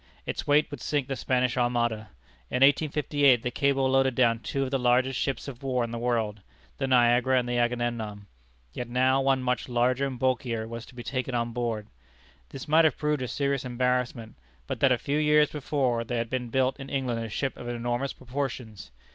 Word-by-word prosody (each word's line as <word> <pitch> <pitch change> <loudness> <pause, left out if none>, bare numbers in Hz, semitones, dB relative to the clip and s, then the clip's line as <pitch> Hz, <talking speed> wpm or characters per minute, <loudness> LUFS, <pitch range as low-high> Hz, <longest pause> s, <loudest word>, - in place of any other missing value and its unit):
Its - - -4
weight 145 +1 +3
would 145 - -7
sink 145 -3 -1
the 135 - -2
Spanish 125 -1 0
Armada. 120 -3 0 0.4
In 125 - +2
1858, 145 -3 +3
the 125 - -2
cable 135 +1 +1
loaded 135 -1 +2
down 115 -2 +3
two 135 +4 -2
of 130 - -4
the 135 - +1
largest 125 +1 +2
ships 135 - -2
of 135 -2 -8
war 130 -3 0
in 115 - -4
the 120 - -4
world, 115 -4 -1 0.4
the 135 - 0
Niagara 125 +1 +4
and 125 -1 0
the 120 0 0
Agamemnon. 120 -4 -2 0.5
Yet 120 -1 -5
now 130 +2 +3
one 135 -1 +2
much 125 0 -1
larger 125 +3 +1
and 130 -2 -6
bulkier 120 -3 -1
was 115 0 -7
to - - -16
be 120 - -7
taken 130 +1 -3
on 120 0 -1
board. 115 -3 -2 0.6
This 135 - -8
might 160 +2 +5
have 155 - +2
proved 150 -2 0
a 125 - -2
serious 140 0 -1
embarrassment, 125 -2 -1 0.3
but - - -4
that 135 - +4
a 125 - +4
few 145 +5 -1
years 150 0 +4
before 135 -5 -1
there 120 +1 -3
had 115 0 -3
been 125 -2 -2
built 130 +3 +1
in 135 0 -8
England 125 -4 -2
a 115 - -5
ship 135 +5 -2
of 120 - -9
enormous 120 +3 -2
proportions. 125 - -5
125 Hz, 205 wpm, -27 LUFS, 120-135 Hz, 0.6 s, might